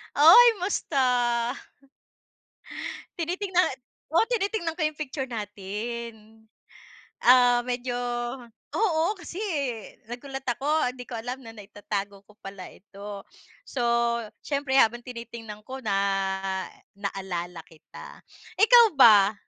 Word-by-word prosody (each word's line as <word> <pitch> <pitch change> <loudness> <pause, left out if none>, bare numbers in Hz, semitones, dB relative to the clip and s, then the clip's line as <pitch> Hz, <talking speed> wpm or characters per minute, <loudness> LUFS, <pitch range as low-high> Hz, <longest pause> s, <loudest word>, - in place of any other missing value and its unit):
Uy, 450 +11 +8
musta? 250 -9 +1 1.6
Tinitingnan, 360 -1 0 0.4
oo 335 - +5
tinitingnan 400 -7 -1
ko - - -4
yung 305 0 -3
picture 265 -3 -4
natin, 220 +1 -6 0.8
ah, 245 -1 +6
medyo 245 0 -3 0.8
oo 345 -8 +1 0.2
kasi, 345 +1 -9
eh, 280 - -4
nagulat 270 +2 -7
ako 275 +3 +1
'di 250 -1 -9
ko - - -10
alam 250 +3 -6
na 225 - -9
naitatago 205 -1 -6
ko 210 - -20
pala 195 -1 -9
ito. 200 +1 -10 0.5
So, 255 - -4 0.6
siyempre 280 -2 -1
habang 240 +1 +3
tinitingnan 235 -3 -9
ko 265 +1 -7
na 205 -3 0 1.0
naalala 180 -4 -5
kita. 160 -1 -13 0.4
Ikaw 470 +2 +8
ba 210 -5 +7
245 Hz, 105 wpm, -26 LUFS, 210-295 Hz, 1.6 s, Uy